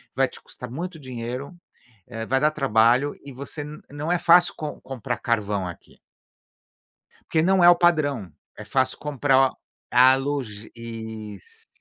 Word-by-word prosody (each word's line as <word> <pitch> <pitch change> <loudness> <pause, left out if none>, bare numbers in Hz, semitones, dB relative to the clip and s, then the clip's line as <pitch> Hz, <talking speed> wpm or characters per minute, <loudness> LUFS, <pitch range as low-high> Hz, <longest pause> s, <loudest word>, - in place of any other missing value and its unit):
vai - - +3
te - - -13
custar 125 - -10
muito 165 +5 -6
dinheiro, 130 +4 -6 0.5
eh, 115 -2 -6
vai 135 +1 +2
dar 150 +1 +4
trabalho 130 -1 +3
e 140 - -9
você 140 +3 -7
nã 150 +1 -9
não 150 +4 -3
é 175 - +2
fácil 175 +1 +5
com 150 -2 -5
comprar 125 -2 -4
carvão 105 -5 -1
aqui. 85 - -11 1.3
Porque 160 - +2
não 185 +1 +3
é 175 - +9
o 175 - +8
padrão, 145 - +1 0.3
é 105 - -8
fácil 130 +4 0
comprar 135 -2 +2
o - - -24 0.4
a 130 +2 +7
logis 135 -7 -4
Isso, 110 -3 -9
135 Hz, 160 wpm, -24 LUFS, 115-150 Hz, 1.3 s, é